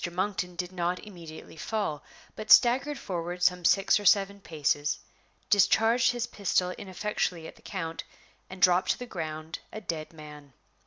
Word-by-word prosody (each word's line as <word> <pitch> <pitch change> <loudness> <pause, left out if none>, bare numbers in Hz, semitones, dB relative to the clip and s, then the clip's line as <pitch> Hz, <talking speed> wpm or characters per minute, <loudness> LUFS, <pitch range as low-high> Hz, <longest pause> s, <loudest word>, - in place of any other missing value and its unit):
Monkton 180 -1 -2
did 180 +1 -4
not 180 0 -1
immediately 170 -7 -11
fall, 160 -3 -3 0.3
but 215 0 -8
staggered 270 +4 +6
forward 175 -5 -4
some 180 0 +3
six 195 +4 +4
or 205 - -8
seven 200 +1 +4
paces, 150 -3 -1 0.5
discharged 225 +4 +4
his 240 -1 -1
pistol 180 -4 0
ineffectually 185 -3 -3
at - - -10
the - - -21
count, 165 -4 -5 0.5
and 185 -1 -6
dropped 180 0 +4
to - - +2
the 250 - -6
ground 160 -5 -6
a 215 - -6
dead 160 -6 -5
man. 150 -3 -12
180 Hz, 155 wpm, -28 LUFS, 165-205 Hz, 0.5 s, staggered